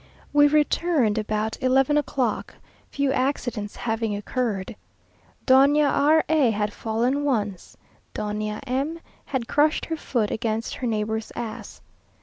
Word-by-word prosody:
We 290 0 +6
returned 295 -6 +2
about 215 +1 -2
eleven 265 +3 +3
o'clock, 260 -6 -1 0.3
few 280 -1 0
accidents 245 -6 -2
having 225 -2 -2
occurred. 210 -1 -3 0.7
Doña 280 +2 +5
R 310 +2 +4
a 305 -6 +3
had 210 -1 -1
fallen 240 +6 -1
once. 210 -9 -2 0.4
Doña 210 0 -3
M 275 +6 -2 0.3
had 260 -5 -3
crushed 300 +1 +2
her 325 - -3
foot 230 -8 -1
against 225 0 -2
her 250 - -4
neighbour's 220 0 -2
ass. 235 -2 -7
245 Hz, 125 wpm, -24 LUFS, 215-285 Hz, 0.7 s, We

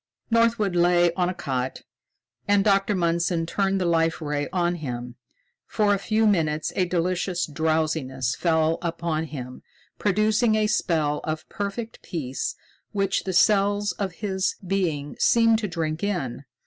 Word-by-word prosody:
Northwood 230 -4 +2
lay 175 0 +4
on 180 0 0
a - - -2
cot, 130 -4 -3 0.6
and 205 -1 +4
Dr. 200 0 +2
Mundson 170 -1 +1
turned 195 +2 0
the 185 - 0
Life 165 -1 +2
Ray 145 -2 -2
on 175 -1 +1
him. 125 -5 -5 0.5
For 210 -2 +2
a 200 - 0
few 215 +2 +1
minutes 155 -7 +1
a 185 - +2
delicious 180 0 -1
drowsiness 155 -5 -1
fell 160 -1 +1
upon 165 -2 -2
him, 130 -5 -8 0.4
producing 215 +3 +2
a 215 0 +2
spell 155 -7 0
of 155 0 -4
perfect 215 +3 -5
peace 135 -6 -4 0.4
which 195 -1 0
the 190 - -1
cells 205 +1 +3
of 190 0 -4
his 190 0 -1
being 170 -7 -1
seemed 230 -1 +4
to 215 - -2
drink 165 -1 -3
in. 145 -10 -2
175 Hz, 145 wpm, -25 LUFS, 155-200 Hz, 0.6 s, lay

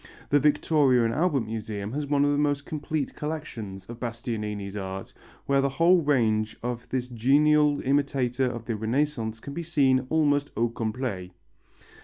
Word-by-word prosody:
The 145 - +4
Victoria 145 -4 +3
and 115 - 0
Albert 155 -2 +1
Museum 110 -2 -5
has 145 0 -2
one 145 0 +3
of 145 - +2
the 145 - +1
most 145 -1 0
complete 155 -1 -3
collections 115 -11 -6
of 120 +3 -9
Bastianini's 105 -4 -4
art, 95 -1 -6 0.3
where 140 0 +3
the 140 - +1
whole 170 +6 +4
range 110 -7 +1
of 120 -1 -4
this 125 -1 -2
genial 145 +5 +3
imitator 135 -2 +1
of 120 -2 -5
the 115 - -2
Renaissance 115 0 -1
can 140 - -8
be 170 - -4
seen 135 -6 +2
almost 145 -2 +2
au 120 +1 +2
complet. 115 -5 -3
130 Hz, 160 wpm, -26 LUFS, 115-145 Hz, 0.3 s, The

